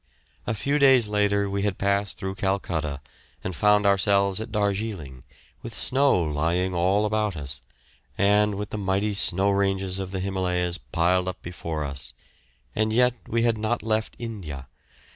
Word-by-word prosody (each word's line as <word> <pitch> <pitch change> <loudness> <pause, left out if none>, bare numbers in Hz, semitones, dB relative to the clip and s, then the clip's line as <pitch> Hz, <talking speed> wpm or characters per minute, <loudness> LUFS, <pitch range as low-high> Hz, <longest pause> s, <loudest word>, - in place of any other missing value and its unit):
A 115 - 0
few 140 +7 0
days 130 -6 +6
later 100 -1 +2
we 100 0 -2
had 100 -2 -1
passed 100 0 0
through 95 0 -4
Calcutta 85 -7 -2 0.4
and 95 - -4
found 105 +2 +3
ourselves 100 0 +3
at 110 +1 -7
Darjeeling, 100 - -2 0.4
with 115 -1 -8
snow 135 -8 +2
lying 85 +5 0
all 95 +4 +2
about 105 -4 0
us, 70 -2 -6 0.6
and 105 +1 +3
with 105 +1 -5
the 105 - -3
mighty 100 +2 0
snow 100 0 +3
ranges 95 -1 0
of 95 -1 -4
the 95 0 -4
Himalayas 90 -2 -1
piled 90 +2 +1
up 90 - -4
before 85 -3 -4
us, 70 -1 -6 0.6
and 110 0 +1
yet 125 +2 +4
we 115 +1 0
had 115 -2 +1
not 110 +2 -1
left 110 0 -1
India. 90 - -7
100 Hz, 160 wpm, -25 LUFS, 90-105 Hz, 0.6 s, days